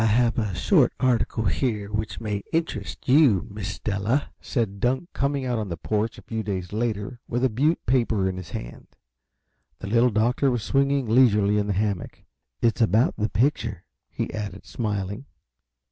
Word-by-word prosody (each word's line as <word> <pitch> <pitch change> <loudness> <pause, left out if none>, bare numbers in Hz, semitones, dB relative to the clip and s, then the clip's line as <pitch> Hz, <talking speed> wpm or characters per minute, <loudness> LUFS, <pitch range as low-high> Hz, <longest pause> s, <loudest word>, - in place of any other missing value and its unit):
"I - - +3
have 115 +2 +3
a 105 -5 -2
short - - +3
article 120 -3 +1
here 100 - -1
which 105 0 -3
may 105 -2 -2
interest 160 -11 -3
you, 130 - +5
Miss 100 -1 -5
Della," 105 +7 -1
said 110 -6 -2
Dunk, 130 - 0
coming 140 -1 -1
out 120 -2 0
on 105 -3 -4
the 85 - -4
porch 110 +5 -1
a - - -12
few 110 -1 -3
days 95 -3 -4
later 115 +2 -2
with 120 +2 -1
a 130 - +4
Butte 145 +9 +1
paper 115 -6 +2
in 95 -1 -3
his 95 -2 -7
hand. - - -7 0.9
The - - -8
Little 115 +5 +3
Doctor 120 +5 +2
was 120 -4 -1
swinging 140 +1 +2
leisurely 105 -4 +4
in 105 - -1
the 100 - 0
hammock. 100 -2 -2 0.4
"It's 115 0 +2
about 110 +3 +3
the 105 0 -1
picture," 115 - 0 0.3
he - - -4
added, 100 -2 -5
smiling. 105 +2 -3
110 Hz, 175 wpm, -25 LUFS, 100-125 Hz, 0.9 s, you